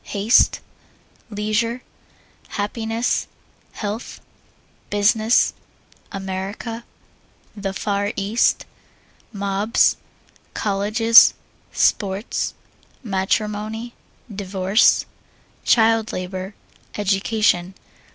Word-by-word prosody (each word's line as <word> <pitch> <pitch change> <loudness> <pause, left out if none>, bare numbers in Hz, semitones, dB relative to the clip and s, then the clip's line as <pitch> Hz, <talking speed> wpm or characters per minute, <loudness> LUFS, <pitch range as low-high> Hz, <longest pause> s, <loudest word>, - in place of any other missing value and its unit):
Haste. 210 +3 +3 0.7
Leisure. 215 +3 -1 0.6
Happiness. 225 +2 -2 0.5
Health. 210 +2 -5 0.7
Business. 215 +3 +3 0.6
America. 195 +4 -5 0.7
The 200 -2 -3
Far 200 +1 -1
East. 205 +4 +1 0.7
Mobs. 200 +1 +1 0.6
Colleges. 215 +3 +5 0.4
Sports. 200 +2 0 0.5
Matrimony. 215 +3 -2 0.4
Divorce. 195 +1 +2 0.6
Child 225 0 +3
Labor. 185 +2 -5 0.4
Education. 195 -2 +1
210 Hz, 55 wpm, -21 LUFS, 195-225 Hz, 0.7 s, Colleges